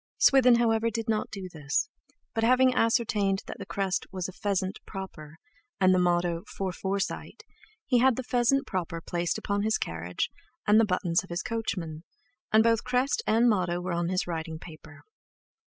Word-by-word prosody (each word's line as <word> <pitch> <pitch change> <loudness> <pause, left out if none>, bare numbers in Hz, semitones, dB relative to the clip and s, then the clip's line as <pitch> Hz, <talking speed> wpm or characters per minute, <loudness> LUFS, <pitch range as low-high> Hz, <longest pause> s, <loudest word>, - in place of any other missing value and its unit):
Swithin, 255 -3 +6
however, 230 -1 +2
did 225 +1 -4
not 220 -1 0
do 195 -3 -6
this, 150 - -1 0.5
but 225 - -1
having 255 +2 +5
ascertained 220 -5 +1
that - - -8
the 200 - -7
crest 195 -3 -1
was 185 -2 -3
a - - -7
"pheasant 195 -1 -2
proper," 160 -6 -8 0.4
and 185 -1 +5
the 185 - +3
motto 175 -1 +1
"For 190 -1 -1
Forsite," 195 +2 -3 0.4
he 250 -2 +3
had 260 0 +4
the 260 - -4
pheasant 250 +2 +2
proper 170 -4 -3
placed 175 +1 -2
upon 200 0 -1
his 220 +1 +1
carriage 85 +2 -3 0.3
and 210 +1 +6
the 225 - +5
buttons 180 -3 0
of 190 - -14
his 170 +1 -3
coachman, 180 -8 -4 0.5
and 220 +1 +6
both 230 -1 +2
crest 260 - +1
and 230 +2 +4
motto 180 -5 +1
on 170 0 -1
his 185 0 0
writing 160 -2 -4
paper. 155 -2 -13
195 Hz, 170 wpm, -28 LUFS, 175-225 Hz, 0.5 s, Swithin